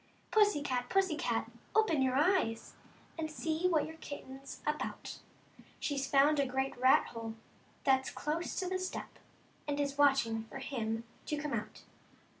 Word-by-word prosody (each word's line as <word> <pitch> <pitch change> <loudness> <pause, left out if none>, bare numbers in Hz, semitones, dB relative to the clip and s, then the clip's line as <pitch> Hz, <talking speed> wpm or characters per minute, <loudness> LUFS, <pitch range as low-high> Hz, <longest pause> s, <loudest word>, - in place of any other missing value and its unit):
k.r 435 - +7
Pussy 410 -9 +1
Cat, 250 -3 -1
Pussy 380 -4 +3
Cat - - -1 0.2
openyour£Jyes^ 300 - +3
»f - - -24 0.4
And 315 -1 -1
see 320 +3 0
what 320 -5 +3
your 320 0 -9
^K'ltten 270 -3 -8
s 275 - -9
about; 300 0 -3 0.6
She's 275 -2 -1
found 285 +2 +5
a 280 - +3
great 265 +1 -1
i^ff/' 255 +2 +4
j^/e 225 -1 -5 0.5
that's 265 -1 +3
close 310 +3 -2
to 370 - -1
the 370 +1 -1
Stea, 370 0 -3 0.6
And 290 0 -1
is 280 0 -1
watching 240 -6 +3
for 225 - -8
dim 230 -4 -2 0.2
to 300 - -1
come 295 0 -3
out. - - -4
285 Hz, 160 wpm, -33 LUFS, 265-315 Hz, 0.6 s, k.r